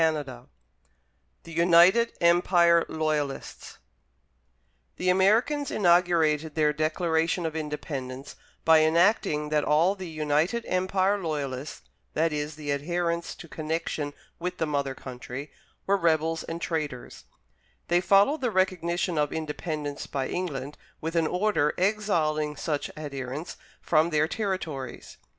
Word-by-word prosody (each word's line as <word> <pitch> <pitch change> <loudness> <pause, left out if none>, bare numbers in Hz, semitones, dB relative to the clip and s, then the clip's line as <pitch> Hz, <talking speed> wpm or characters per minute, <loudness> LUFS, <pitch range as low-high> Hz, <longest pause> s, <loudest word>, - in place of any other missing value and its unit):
Cowper 145 -6 -1 1.0
THE 165 - -11
UNITED 175 +7 +5
EMPIRE 170 0 +4
LOYALISTS 155 -3 -3 1.2
The 180 - -1
Americans 230 +10 +2
inaugurated 170 -4 +2
their 150 -1 +2
Declaration 160 +2 0
of 160 -1 -3
Independence 140 -3 -5 0.3
by 160 -1 +7
enacting 160 -2 +2
that 150 -1 +1
all 165 +6 +3
the 190 -3 -8
United 155 +8 0
Empire 190 +2 +1
Loyalists 145 -5 -4 0.3
that 160 0 +1
is 150 0 -3
the 150 -2 -4
adherents 170 +3 -2
to 170 - -11
connection 155 -2 -3 0.2
with 180 +1 -4
the 160 - 0
mother 140 -3 -2
country 130 +2 -8 0.3
were 200 +1 +3
rebels 165 -2 +1
and 165 +1 -5
traitors; 150 -8 -4 0.6
they 175 +1 +3
followed 200 +11 +4
the 250 - +1
recognition 180 -3 0
of 150 -1 +1
Independence 150 -2 -4
by 135 -2 -2
England 150 -6 -4 0.2
with 165 +2 -4
an 165 -1 +2
order 180 -5 +1
exiling 165 -7 0
such 150 0 -2
adherents 140 +1 -5 0.2
from 160 +1 +2
their 155 -1 +2
territories. 165 - -4
160 Hz, 120 wpm, -27 LUFS, 150-180 Hz, 1.2 s, by